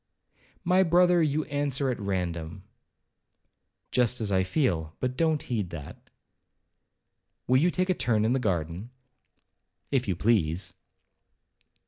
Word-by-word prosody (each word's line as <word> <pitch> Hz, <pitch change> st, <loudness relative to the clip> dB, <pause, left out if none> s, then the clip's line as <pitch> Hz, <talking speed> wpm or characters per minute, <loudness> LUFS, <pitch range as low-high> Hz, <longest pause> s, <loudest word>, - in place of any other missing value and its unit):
'My 185 Hz, +1 st, +4 dB
brother, 175 Hz, 0 st, +4 dB
you 155 Hz, 0 st, +1 dB
answer 145 Hz, -2 st, -1 dB
at 120 Hz, -, -5 dB
random.' 90 Hz, -2 st, -3 dB, 1.3 s
'Just 125 Hz, 0 st, +2 dB
as 105 Hz, -3 st, -2 dB
I 95 Hz, -1 st, +3 dB
feel—but 95 Hz, -, -1 dB
don't 160 Hz, 0 st, +1 dB
heed 105 Hz, -7 st, -2 dB
that.' 75 Hz, -5 st, -10 dB, 1.4 s
'Will 130 Hz, -, +3 dB
you 175 Hz, -, +4 dB
take 185 Hz, +1 st, 0 dB
a -, -, +3 dB
turn 110 Hz, -10 st, +1 dB
in 115 Hz, -, +2 dB
the 135 Hz, -, +1 dB
garden?' 90 Hz, -1 st, -2 dB, 1.0 s
'If 130 Hz, -4 st, +1 dB
you 95 Hz, -, 0 dB
please.' 95 Hz, -4 st, 0 dB
120 Hz, 120 wpm, -27 LUFS, 95-145 Hz, 1.4 s, My